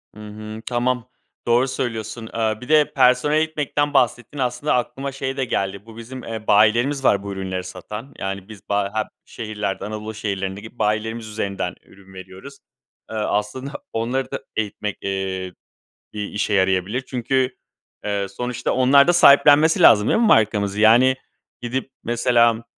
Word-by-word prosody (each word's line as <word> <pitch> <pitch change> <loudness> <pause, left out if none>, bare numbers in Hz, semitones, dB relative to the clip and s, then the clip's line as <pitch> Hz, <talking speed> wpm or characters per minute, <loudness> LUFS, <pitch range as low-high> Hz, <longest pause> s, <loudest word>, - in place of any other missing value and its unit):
Hı - - -13
hı. 110 +1 -8
Tamam 125 0 -1 0.4
doğru 120 +3 +3
söylüyorsun. 115 -3 -4
Eee, 110 -1 0
bir 125 - -10
de, 155 -1 +4
personel 130 +3 +3
eğitmekten 150 -2 0
bahsettin. 120 +1 +1
Aslında 125 +3 0
aklıma 135 +3 -2
şey 135 0 -4
de 135 - 0
geldi. 100 -3 -3
Bu 115 -1 -13
bizim, 125 +3 -8
eee, 110 -1 -7
bayilerimiz 120 +7 +3
var 100 -5 +3
bu 100 - -5
ürünleri 95 -1 -4
satan. 105 +9 -8
Yani, 95 +1 -5
biz 105 -3 -13
ba 100 -1 0
hep 110 -1 -1 0.2
şehirlerden, 105 -3 -4
Anadolu 110 +1 -6
şehirlerindeki 100 +2 -5
bayilerimiz 110 +2 -1
üzerinden 100 -4 -3
ürün 95 -1 -19
veriyoruz. 95 +9 -11 0.5
Eee, - - -5
aslında 105 +5 -2 0.2
onları 125 +4 -2
da - - -3 0.2
eğitmek, 105 -1 -3
eee, 95 -1 -3 0.6
bir 105 - -4
işe 105 0 -1
yarayabilir. 95 +4 +1
Çünkü, 130 +1 -1 0.5
eee, 100 -1 -1
sonuçta 125 +3 -3
onlar 135 +4 +5
da - - +6
sahiplenmesi 150 -1 +6
lazım 105 -1 +7
değil - - +3
mi 235 - +4
markamızı? 105 - +2
Yani, 120 +4 +6 0.4
gidip, 130 +2 -3
mesela, 120 -1 +2
110 Hz, 150 wpm, -21 LUFS, 105-130 Hz, 0.6 s, lazım